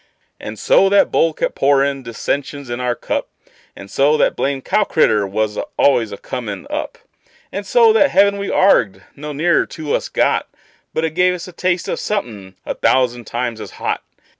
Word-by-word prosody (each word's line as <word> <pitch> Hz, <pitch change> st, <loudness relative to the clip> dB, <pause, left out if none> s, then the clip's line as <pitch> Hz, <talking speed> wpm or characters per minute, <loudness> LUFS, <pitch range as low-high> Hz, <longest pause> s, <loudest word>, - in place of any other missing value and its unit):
And 105 Hz, +1 st, -7 dB
so 195 Hz, -, +4 dB
that 200 Hz, 0 st, +3 dB
bowl 165 Hz, -, +3 dB
kept -, -, -2 dB
pourin' 140 Hz, 0 st, +2 dB
dissensions 130 Hz, +3 st, -4 dB
in 120 Hz, -, -3 dB
our 125 Hz, -1 st, -1 dB
cup; -, -, -3 dB, 0.5 s
And 100 Hz, -, -10 dB
so 145 Hz, +3 st, +3 dB
that -, -, +2 dB
blamed 135 Hz, -1 st, -2 dB
cow 210 Hz, -, +2 dB
critter 110 Hz, -, +2 dB
was 105 Hz, +1 st, -2 dB, 0.2 s
always 120 Hz, -6 st, +3 dB
a 100 Hz, -, -6 dB
comin' 105 Hz, -6 st, -6 dB
up; -, -, -4 dB, 0.5 s
And 200 Hz, 0 st, -5 dB
so 230 Hz, 0 st, +5 dB
that 275 Hz, +6 st, +4 dB
heaven 200 Hz, +1 st, +3 dB
we 200 Hz, -, -3 dB
arg'ed 100 Hz, -, +3 dB
no 150 Hz, +1 st, -7 dB
nearer 170 Hz, +4 st, +1 dB
to 155 Hz, -2 st, -5 dB
us -, -, -1 dB
got, -, -, +1 dB, 0.4 s
But 160 Hz, -, -1 dB
it 160 Hz, -, -2 dB
gave 180 Hz, +2 st, +2 dB
us 175 Hz, -, -8 dB
a -, -, -9 dB
taste 180 Hz, 0 st, -1 dB
of -, -, -2 dB
somethin' 105 Hz, -, -4 dB
a -, -, -2 dB
thousand 120 Hz, -2 st, +1 dB
times 120 Hz, -2 st, -3 dB
as -, -, -9 dB
hot. -, -, -2 dB
140 Hz, 190 wpm, -18 LUFS, 115-180 Hz, 0.5 s, so